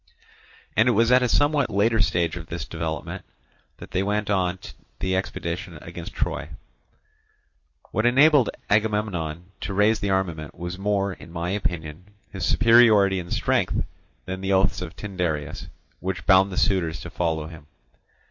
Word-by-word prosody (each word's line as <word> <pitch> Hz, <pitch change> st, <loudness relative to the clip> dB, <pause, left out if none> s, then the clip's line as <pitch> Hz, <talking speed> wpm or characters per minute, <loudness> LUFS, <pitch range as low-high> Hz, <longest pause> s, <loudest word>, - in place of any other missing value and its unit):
And 115 Hz, +4 st, +4 dB
it -, -, +3 dB
was 115 Hz, +3 st, +3 dB
at 125 Hz, 0 st, +6 dB
a 125 Hz, -, +1 dB
somewhat 145 Hz, +1 st, +2 dB
later 110 Hz, +3 st, +2 dB
stage 85 Hz, -5 st, +1 dB
of 85 Hz, -2 st, -8 dB
this 85 Hz, -2 st, -5 dB
development 80 Hz, -2 st, -5 dB, 0.5 s
that -, -, -11 dB
they 95 Hz, -, 0 dB
went 105 Hz, +1 st, -1 dB
on 95 Hz, -2 st, +1 dB, 0.4 s
the 95 Hz, +6 st, -1 dB
expedition 90 Hz, -2 st, -4 dB
against -, -, -9 dB
Troy. -, -, -2 dB, 1.4 s
What 110 Hz, +2 st, +1 dB
enabled 135 Hz, 0 st, +5 dB, 0.2 s
Agamemnon 100 Hz, -6 st, -1 dB
to 95 Hz, +2 st, -4 dB
raise 105 Hz, +2 st, +3 dB
the 100 Hz, -, -2 dB
armament 85 Hz, -6 st, -2 dB
was 90 Hz, +2 st, -5 dB
more, 100 Hz, -1 st, 0 dB
in 85 Hz, -, -13 dB
my 85 Hz, +1 st, -3 dB
opinion, 85 Hz, -4 st, -3 dB, 0.3 s
his 95 Hz, -, -6 dB
superiority 110 Hz, -5 st, +5 dB
in 85 Hz, -1 st, -7 dB
strength, -, -, 0 dB, 0.4 s
than 95 Hz, +1 st, -5 dB
the 95 Hz, 0 st, 0 dB
oaths 95 Hz, +1 st, +2 dB
of 90 Hz, 0 st, -6 dB
Tyndareus, 90 Hz, -7 st, -3 dB, 0.3 s
which 95 Hz, 0 st, -4 dB
bound 95 Hz, 0 st, +5 dB
the 90 Hz, -, -6 dB
suitors 85 Hz, -5 st, +1 dB
to 85 Hz, -, -8 dB
follow 80 Hz, -3 st, -1 dB
him. 80 Hz, -2 st, -11 dB
95 Hz, 155 wpm, -24 LUFS, 85-105 Hz, 1.4 s, at